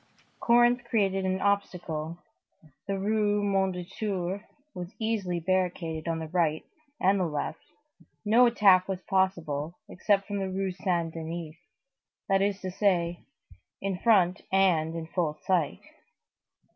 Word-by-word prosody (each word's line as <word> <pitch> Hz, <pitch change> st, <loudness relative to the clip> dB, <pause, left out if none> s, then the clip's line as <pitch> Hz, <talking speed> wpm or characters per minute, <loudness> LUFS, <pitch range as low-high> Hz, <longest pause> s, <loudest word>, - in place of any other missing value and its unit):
Corinthe 240 Hz, +1 st, +4 dB
created 195 Hz, -5 st, +1 dB
an 190 Hz, 0 st, 0 dB
obstacle, 170 Hz, -5 st, -1 dB, 0.7 s
the 195 Hz, 0 st, -1 dB
Rue 205 Hz, +1 st, +1 dB
Mondétour 190 Hz, 0 st, -1 dB, 0.3 s
was 180 Hz, +1 st, -7 dB
easily 210 Hz, -6 st, -1 dB
barricaded 175 Hz, -2 st, -1 dB
on 165 Hz, -1 st, 0 dB
the 160 Hz, 0 st, -5 dB
right 160 Hz, -3 st, 0 dB, 0.3 s
and 195 Hz, +2 st, +3 dB
the 185 Hz, -, +1 dB
left, 155 Hz, +1 st, -4 dB, 0.6 s
no 235 Hz, +4 st, +6 dB
attack 195 Hz, -6 st, +5 dB
was 190 Hz, -2 st, -3 dB
possible 170 Hz, -5 st, -1 dB
except 195 Hz, +1 st, +1 dB
from 205 Hz, -1 st, -3 dB
the 190 Hz, -1 st, -2 dB
Rue 190 Hz, 0 st, -2 dB
Saint 175 Hz, -3 st, -1 dB
Denis, 165 Hz, -1 st, -6 dB, 0.7 s
that 195 Hz, -1 st, +3 dB
is 200 Hz, 0 st, 0 dB
to 185 Hz, -1 st, -4 dB
say, 175 Hz, -3 st, 0 dB, 0.5 s
in 195 Hz, -2 st, -3 dB
front, 185 Hz, -6 st, +3 dB
and 170 Hz, -4 st, +3 dB
in 165 Hz, -1 st, -4 dB
full 160 Hz, -2 st, -1 dB
sight. 175 Hz, -6 st, +1 dB
185 Hz, 130 wpm, -28 LUFS, 170-200 Hz, 0.7 s, no